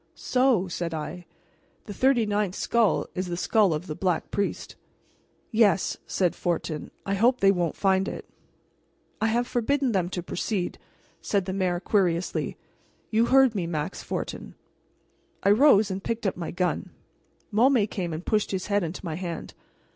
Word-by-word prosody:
"So," 250 -7 +2
said 170 -1 -3
I, 170 +3 -6 0.6
"the 205 - -7
thirty 255 +1 +3
ninth 205 -2 -1
skull 230 -3 +2
is 185 0 -3
the 175 -1 -3
skull 205 0 +3
of 155 +2 -2
the 155 - -4
Black 180 +1 -1
Priest." 200 0 -2 0.8
"Yes," 215 -4 +3
said 180 -3 0
Fortin. 165 -3 -2 0.2
"I 195 - -1
hope 240 +6 +3
they 195 0 +5
won't 175 -4 -1
find 190 0 +2
it." - - -6 0.9
"I 220 - +3
have 235 +2 +1
forbidden 260 +2 0
them 185 -4 0
to 180 -1 -4
proceed," 180 +1 -3 0.4
said 200 -3 0
the 190 - -3
mayor 185 -2 0
querulously. 185 -3 0 0.5
"You 225 +1 +3
heard 265 -3 +5
me, 185 -5 -2
Max 160 +2 -3
Fortin." - - -5 0.9
I 200 - +5
rose 215 -4 +5
and 190 +1 -4
picked 230 -1 -3
up 195 - 0
my 170 -2 -5
gun. 180 +1 -1 0.6
Môme 235 -1 +4
came 180 -5 -4
and 160 +3 -5
pushed 215 -1 +1
his 190 -1 -2
head 205 0 +1
into 175 +2 -5
my 165 - -3
hand. 170 0 -5
195 Hz, 160 wpm, -26 LUFS, 175-220 Hz, 0.9 s, they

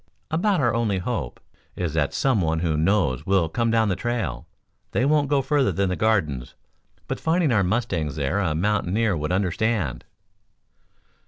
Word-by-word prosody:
About 185 +4 +1
our 120 -5 +2
only 115 -4 0
hope 90 - -4 0.4
is 85 -4 -3
that 75 -3 +1
some 130 -7 +1
one 80 -1 0
who 80 -3 0
knows 80 -5 +1
will 95 -4 +3
come 115 +8 -1
down 110 -1 +3
the 95 - 0
trail. 100 - -3 0.5
They 125 - +2
won't 145 -1 +2
go 140 -2 +2
further 140 0 +2
than 100 -1 0
the 90 - -1
Gardens, 80 - 0 0.5
but - - -3
finding 160 -2 +1
our 110 -3 +3
mustangs 90 - -1
there 75 +6 -1
a 85 -6 0
mountaineer 105 +3 +1
would 75 +1 -3
understand." 95 - -1
100 Hz, 165 wpm, -24 LUFS, 80-120 Hz, 0.5 s, will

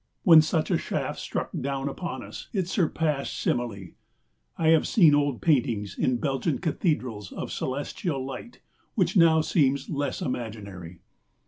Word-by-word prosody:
When 165 -3 +9
such 155 +1 0
a - - +2
shaft - - -3
struck - - -4
down 135 0 -2
upon 135 -3 -5
us, - - -9
it 190 -5 0
surpassed 160 -6 -1
simile. 105 -7 -2 0.7
I 160 - +2
have 160 -1 +4
seen 165 -9 +5
old 145 -4 +1
paintings 115 - +1
in 130 -1 +1
Belgian 135 +3 -1
cathedrals 130 - -2
of - - -6
celestial 140 +1 -3
light 135 - -8 0.3
which 185 -4 +1
now 165 -3 +6
seems 140 -3 +1
less 145 -3 -2
imaginary. 100 -8 -6
140 Hz, 140 wpm, -26 LUFS, 120-160 Hz, 0.7 s, When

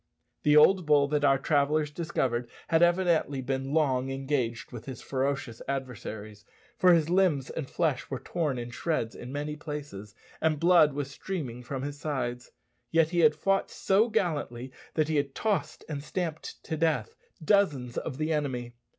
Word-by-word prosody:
The 150 0 +5
old 180 +2 +6
bull 145 -2 +5
that 150 -1 0
our 135 -1 +5
travellers 150 +2 +1
discovered 130 -7 -1 0.2
had 165 0 +3
evidently 175 -5 +3
been 135 +1 -2
long 135 -4 +1
engaged 135 -2 -2
with 120 -3 -8
his 130 -3 -7
ferocious 135 -3 -2
adversaries, 110 -6 -5 0.3
for 180 0 +5
his 165 -3 +4
limbs 175 -8 +2
and 145 -5 -5
flesh 150 -6 -1
were 135 - -2
torn 150 0 -2
in 120 0 -5
shreds 120 -5 -2
in 125 - -9
many 145 +2 -3
places, 145 -10 -7 0.3
and 155 -2 +2
blood 170 -3 +5
was 140 -1 -4
streaming 135 -6 -5
from 130 +2 -5
his 145 0 -5
sides. 125 -5 -3 0.4
Yet 165 -1 +3
he 175 - +1
had 155 -2 +5
fought 195 +5 +1
so 205 +5 +2
gallantly 145 - -1 0.2
that 155 -2 +2
he 155 -1 0
had 140 -1 -1
tossed 205 -7 -1
and 145 -3 -5
stamped 160 -1 -4
to 160 - -3
death 155 -9 0 0.3
dozens 150 - +2
of 135 -5 -4
the 155 +1 0
enemy. 125 -5 -2
145 Hz, 170 wpm, -28 LUFS, 130-160 Hz, 0.4 s, old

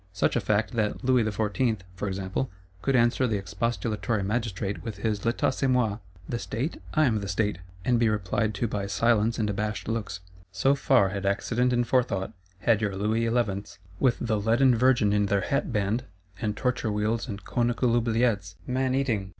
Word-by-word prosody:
Such 90 - +1
a 120 - +2
Fact, 105 +2 +1
that 110 -3 -1
Louis 125 -2 +4
XIV., 110 +1 0
for 90 +2 -4
example, 95 +6 -2 0.3
could 135 - +1
answer 120 +2 +3
the 110 -3 0
expostulatory 110 +2 -2
Magistrate 105 -2 -2
with 115 -2 -5
his 105 -3 -2
'L'Etat 120 +4 +1
c'est 135 +1 -1
moi 120 -5 +1 0.3
(The 120 - -2
State? 115 - -3
I 155 -1 +5
am 110 -5 +2
the 100 - -4
State);' 105 0 0 0.3
and 120 -2 +3
be 115 -1 +3
replied 105 +1 0
to 115 +4 0
by 100 -2 -3
silence 115 +1 +2
and 110 - 0
abashed 105 0 -2
looks. 105 -5 -3 0.3
So 95 +9 +3
far 100 -8 +3
had 100 0 -3
accident 120 +5 +1
and 120 0 +2
forethought; 115 -6 0 0.3
had 115 -2 +3
your 100 -3 -1
Louis 110 +4 0
Elevenths, 105 -6 -1 0.2
with 130 -3 +3
the 110 -3 0
leaden 120 +4 +4
Virgin 120 -4 +3
in 105 -1 +2
their 100 0 +2
hatband, 115 -2 0 0.4
and 105 -1 -1
torture 125 -4 0
wheels 110 +4 -1
and 105 -3 -6
conical 120 0 +1
oubliettes 115 -5 +1
(man 130 +1 0
eating!) 115 -8 0
110 Hz, 180 wpm, -27 LUFS, 100-120 Hz, 0.4 s, I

